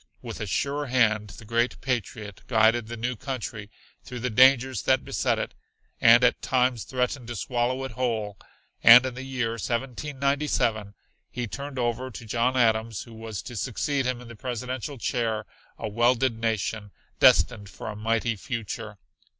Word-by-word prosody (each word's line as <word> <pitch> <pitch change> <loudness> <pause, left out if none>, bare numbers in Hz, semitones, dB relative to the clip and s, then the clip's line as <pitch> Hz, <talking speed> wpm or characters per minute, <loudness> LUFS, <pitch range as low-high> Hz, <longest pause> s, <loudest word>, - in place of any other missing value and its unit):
With - - -7
a - - -3
sure 145 +1 -1
hand 110 -4 +2
the 110 - -12
great 115 +3 0
patriot 110 -5 -4
guided 110 0 +3
the 120 +1 -6
new 125 +2 -2
country 110 -4 -5 0.3
through 125 -2 -7
the 125 0 -1
dangers 130 0 +5
that - - +2
beset - - 0
it - - -4 0.5
and 120 +2 +7
at 125 - +3
times 125 -3 +1
threatened 125 -1 -2
to 120 - -5
swallow 125 +4 -1
it 130 - -5
whole, 110 -5 -2 0.4
and 120 +2 +9
in 130 - -3
the 130 - -7
year 130 -3 -2
1797 125 -2 -1 0.3
he 125 -1 -4
turned 140 +4 -7
over 125 +1 -1
to 120 -1 -9
John 120 +4 0
Adams 110 -2 +1
who 115 - -14
was 110 -2 -6
to 120 - -8
succeed 130 +4 -1
him 125 -1 -2
in 125 - -11
the 115 - -10
presidential 125 +3 -5
chair 115 -3 -1 0.3
a - - -4
welded 120 +3 +2
nation, 110 -1 -2 0.3
destined 105 -5 +4
for - - -9
a 110 - -5
mighty 115 +2 0
future. 115 0 -5
120 Hz, 165 wpm, -26 LUFS, 110-130 Hz, 0.5 s, and